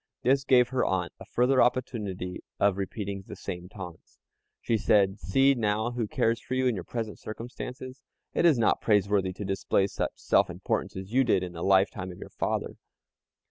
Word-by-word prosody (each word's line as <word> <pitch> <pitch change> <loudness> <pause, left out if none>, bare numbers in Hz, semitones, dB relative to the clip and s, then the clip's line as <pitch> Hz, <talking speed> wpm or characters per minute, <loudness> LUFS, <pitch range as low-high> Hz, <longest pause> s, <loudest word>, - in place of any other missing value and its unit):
This 135 +2 +3
gave 125 -2 +4
her 130 -1 +1
aunt 95 -2 -1
a - - -10
further 125 +2 +3
opportunity 105 -7 -1 0.2
of 100 -2 +3
repeating 100 0 -4
the - - -7
same 90 0 -6
taunts. 90 -5 -10 0.4
She 115 - 0
said, 100 -2 +3
"See 135 - +3
now 110 -1 0
who 120 -3 -2
cares 115 +2 +1
for 130 - -4
you 130 0 +1
in 125 - +3
your 95 -5 -4
present 110 +1 -5
circumstances. 125 +3 -7 0.3
It - - +1
is 165 -6 +5
not 115 - +2
praiseworthy 100 -3 +2
to 100 +2 -6
display 95 0 +1
such 100 - -3
self - - +2
importance - - -2
as 95 +3 -7
you 135 +1 +5
did 110 -6 +2
in 90 - -5
the 85 - -7
lifetime 95 0 +2
of 90 - -11
your - - -9
father." - - -2
105 Hz, 185 wpm, -28 LUFS, 95-125 Hz, 0.4 s, is